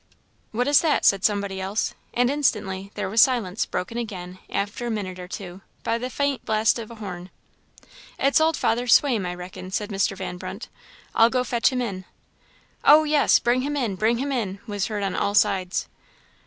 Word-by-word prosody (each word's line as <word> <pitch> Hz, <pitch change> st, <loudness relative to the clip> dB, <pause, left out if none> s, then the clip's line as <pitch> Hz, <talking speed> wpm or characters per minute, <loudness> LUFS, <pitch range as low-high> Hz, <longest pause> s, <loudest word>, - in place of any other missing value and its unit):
"What 245 Hz, +4 st, -1 dB
is 290 Hz, 0 st, +6 dB
that?" 315 Hz, -3 st, +1 dB
said 195 Hz, -1 st, +4 dB
somebody 200 Hz, -2 st, 0 dB
else; 195 Hz, +3 st, -1 dB, 0.2 s
and 245 Hz, +1 st, +2 dB
instantly 210 Hz, -9 st, -1 dB
there 205 Hz, -2 st, -2 dB
was 215 Hz, +4 st, +4 dB
silence, 230 Hz, -6 st, +2 dB
broken 230 Hz, +6 st, -3 dB
again, 185 Hz, -5 st, -6 dB
after 205 Hz, +4 st, -3 dB
a -, -, -2 dB
minute 190 Hz, -5 st, -4 dB
or 180 Hz, -, -7 dB
two, 190 Hz, -1 st, -8 dB, 0.2 s
by 230 Hz, -, 0 dB
the 250 Hz, +2 st, -4 dB
faint 280 Hz, 0 st, -1 dB
blast 220 Hz, +2 st, +2 dB
of 225 Hz, -, -7 dB
a 235 Hz, -, -10 dB
horn. 185 Hz, -4 st, -7 dB, 0.9 s
"It's 275 Hz, +3 st, +3 dB
old 320 Hz, 0 st, +2 dB
Father 240 Hz, +2 st, 0 dB
Swaim, 235 Hz, -6 st, +4 dB
I 180 Hz, -, -4 dB
reckon," 180 Hz, +1 st, -8 dB
said 210 Hz, +3 st, -3 dB
Mr. 195 Hz, 0 st, 0 dB
Van 180 Hz, -, -5 dB
Brunt; -, -, -7 dB, 0.4 s
"I'll 225 Hz, +1 st, +5 dB
go 250 Hz, 0 st, +1 dB
fetch 240 Hz, +1 st, +1 dB
him 250 Hz, -1 st, -1 dB
in." 190 Hz, -5 st, -5 dB, 0.8 s
"Oh, 305 Hz, +2 st, +7 dB
yes! 300 Hz, -1 st, +4 dB
bring 245 Hz, +2 st, +1 dB
him 290 Hz, +2 st, -2 dB
in 235 Hz, -7 st, -1 dB
bring 220 Hz, +5 st, +1 dB
him 280 Hz, +3 st, -2 dB
in," 210 Hz, -7 st, -2 dB
was 205 Hz, -3 st, -2 dB
heard 210 Hz, -2 st, -3 dB
on 195 Hz, -2 st, -2 dB
all 205 Hz, -, 0 dB
sides. 185 Hz, -3 st, +1 dB
215 Hz, 195 wpm, -24 LUFS, 190-245 Hz, 0.9 s, Oh